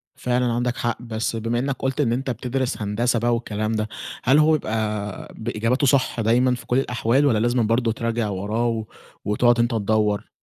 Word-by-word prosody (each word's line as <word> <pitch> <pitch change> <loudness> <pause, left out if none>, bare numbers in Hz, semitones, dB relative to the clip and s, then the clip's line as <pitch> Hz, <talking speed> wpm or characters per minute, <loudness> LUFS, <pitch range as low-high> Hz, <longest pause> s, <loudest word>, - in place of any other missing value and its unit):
فعلًا 125 0 0
عندك 120 +1 -1
حق، 120 0 -2
بس 115 -1 -3
بما 115 +2 -1
إنك 135 +1 -1
قلت 135 +2 -1
إن 115 -5 +1
أنت 130 +2 -2
بتدرس 125 0 -2
هندسة 115 +3 0
بقى 120 +1 +1
والكلام 110 -2 -3
ده، 110 -1 -1 0.4
هل 135 +4 +4
هو 155 +1 +5
بيبقى 110 -7 -2
بإجاباته 120 +4 0
صح 130 -3 +2
دايمًا 125 +3 +3
في - - -11
كل 125 - +1
الأحوال، 125 +1 +1
والّا 115 -7 +3
لازمًا 120 +2 +2
برضه 115 +1 +1
تراجع 115 -1 -2
وراه 105 +4 -2
و 110 -2 -2 0.4
وتقعد 120 +3 +3
أنت 120 +1 +2
تدّور؟ 105 -1 0
115 Hz, 185 wpm, -23 LUFS, 110-125 Hz, 0.4 s, هو